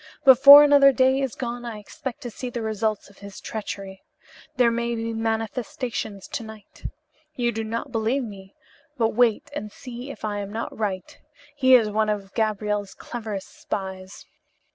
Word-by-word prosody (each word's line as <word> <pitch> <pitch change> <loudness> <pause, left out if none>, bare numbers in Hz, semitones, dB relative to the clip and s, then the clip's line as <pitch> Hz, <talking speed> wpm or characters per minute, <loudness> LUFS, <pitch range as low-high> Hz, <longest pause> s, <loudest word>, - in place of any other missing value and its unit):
Before 275 +2 +10
another 285 -1 +6
day 260 +2 +3
is 270 -3 -2
gone 240 -1 -5
I 235 -3 -6
expect 240 +6 -8
to 245 -3 -6
see 250 +3 -6
the 235 -1 -5
results 215 -1 -2
of 200 - -22
his 200 -1 -10
treachery. 195 -3 -6 0.5
There 245 -3 +4
may 235 0 -1
be 230 0 -3
manifestations 225 -1 -3
to - - -4
night. 220 -1 -13 0.5
You 240 -1 0
do 225 0 -4
not 230 +5 -4
believe 230 +4 0
me, 195 -3 -10 0.4
but 225 -2 +2
wait 240 +4 +1
and 215 -8 -5
see 250 +2 -9
if 280 - -7
I 205 -1 -2
am 200 0 -6
not 225 +2 -5
right. 195 -4 -4 0.4
He 260 -2 +6
is 220 -4 +3
one 215 +1 +1
of 200 -2 -3
Gabriel's 210 -2 -1
cleverest 215 -5 -6
spies." 190 -1 -7
225 Hz, 165 wpm, -24 LUFS, 210-250 Hz, 0.5 s, Before